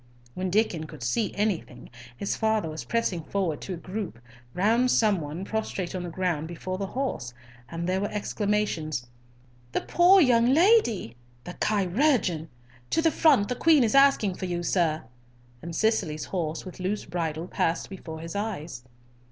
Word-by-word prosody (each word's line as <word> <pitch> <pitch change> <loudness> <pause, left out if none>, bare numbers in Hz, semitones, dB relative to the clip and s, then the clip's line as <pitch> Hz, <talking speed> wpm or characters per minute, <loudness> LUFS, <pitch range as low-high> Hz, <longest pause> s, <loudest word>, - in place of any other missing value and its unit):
When 185 +4 -2
Diccon 180 -5 +1
could 155 -5 -10
see 200 - 0
anything, 205 -10 -2 0.3
his 200 - -2
father 220 -4 +1
was 155 0 -6
pressing 220 -7 0
forward 170 -2 -2
to 190 - -4
a - - -9
group 185 - -5 0.4
round 230 +7 +3
some 210 -7 +3
one 155 +6 -5
prostrate 200 -4 -3
on 185 - -3
the 175 - -5
ground 170 -3 -1
before 185 +2 -5
the 195 - -2
house, 190 - -3 0.3
and 170 +1 -4
there 185 +1 0
were 205 - -1
exclamations, 205 - -1 0.7
"The - - +1
poor 360 +3 +5
young 240 -7 +5
lady! 315 - +3 0.3
The 180 - -7
chirurgeon! 200 - +1 0.4
To 325 - +2
the 325 - +4
front, 280 -13 +4
the 250 - -2
Queen 310 -1 +5
is 220 - +1
asking 275 -8 +5
for 185 +1 -5
you, 175 -1 -2
sir," 165 -3 +1 0.6
and 170 0 -6
Cicely's 190 -9 0
horse 165 -3 -3
with 185 - -9
loose 195 +3 -2
bridle 165 -1 -3
passed 165 -2 -1
before 160 -4 -8
his 165 +2 -7
eyes. 175 - -4
190 Hz, 165 wpm, -27 LUFS, 165-220 Hz, 0.7 s, poor